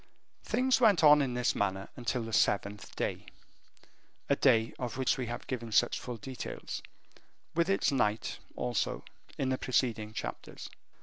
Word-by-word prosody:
Things 260 0 +2
went 205 -8 +5
on 150 -1 +8
in 130 -3 -1
this 125 0 +1
manner 95 -1 -1
until 120 0 -2
the 115 0 -7
seventh 100 -1 +1
day, - - -3 1.0
a 140 - +4
day 115 -5 +3
of 125 -2 -4
which 130 - +2
we 125 -3 -3
have 120 - -5
given 120 -3 -4
such 120 +2 +3
full 125 -2 -6
details, 130 0 -6 0.7
with 170 +2 +1
its 195 - +2
night 110 -5 0 0.2
also, 60 - -2 0.3
in 135 - 0
the 130 - 0
preceding 115 -4 0
chapters. - - -7
125 Hz, 150 wpm, -31 LUFS, 110-140 Hz, 1.0 s, on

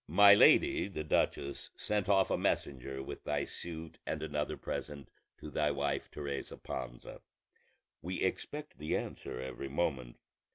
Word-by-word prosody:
"My 100 -1 +8
lady 100 - +6
the 85 -6 -4
duchess 70 -2 0
sent 105 -2 -1
off 95 -1 +4
a - - +4
messenger 65 0 -1
with - - -7
thy 75 -1 0
suit 80 0 -7
and 80 0 -3
another 75 -1 -2
present 75 -2 -5 0.3
to 75 - -9
thy 75 0 +2
wife 70 0 -1
Teresa 70 -2 -5
Panza; - - -6 0.8
we 90 +2 -3
expect 150 +10 -3
the 75 - 0
answer - - -5
every 65 +1 -5
moment. 65 -5 -1
75 Hz, 140 wpm, -33 LUFS, 70-85 Hz, 0.8 s, My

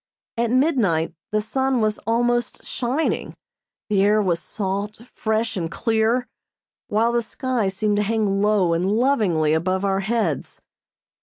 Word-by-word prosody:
At 235 0 0
midnight 240 - +2 0.2
the 215 0 0
sun 265 +2 0
was 215 -1 0
almost 240 +1 0
shining, 260 +6 -2 0.5
the 205 -3 +2
air 210 +2 +4
was 180 -5 +1
salt, 200 +2 -4
fresh 220 0 -1
and 170 -4 -2
clear, 225 +4 +1 0.6
while 225 +3 +2
the 240 0 +1
sky 245 -1 -2
seemed 205 +2 0
to - - +2
hang 205 -2 0
low 205 -5 +3
and 165 +1 0
lovingly 210 - +2
above 185 +4 0
our 195 -1 +1
heads. 200 -6 -2
215 Hz, 140 wpm, -22 LUFS, 195-235 Hz, 0.6 s, air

